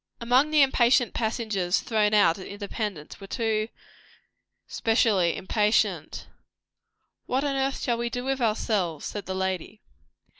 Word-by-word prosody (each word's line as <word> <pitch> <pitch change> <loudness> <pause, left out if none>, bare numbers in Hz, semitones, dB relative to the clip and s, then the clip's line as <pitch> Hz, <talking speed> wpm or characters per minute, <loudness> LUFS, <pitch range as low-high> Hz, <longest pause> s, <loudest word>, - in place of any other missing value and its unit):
Among 250 +5 +3
the 305 -2 +5
impatient 245 -2 +3
passengers 215 -5 -1
thrown 215 -2 +1
out 175 -4 +4
at 185 - -8
Independence 200 -5 -6
were 195 - -9
two 220 -1 -1 1.0
specially 220 -7 +1
impatient. 210 +3 0 1.0
"What 260 +2 0
on 280 -1 -1
earth 270 0 -1
shall 235 -2 0
we 235 0 -1
do 245 +1 -4
with 270 0 -2
ourselves?" 210 -8 -1
said 205 - -6
the 190 - -3
lady. 190 +2 -3
220 Hz, 135 wpm, -26 LUFS, 195-245 Hz, 1.0 s, the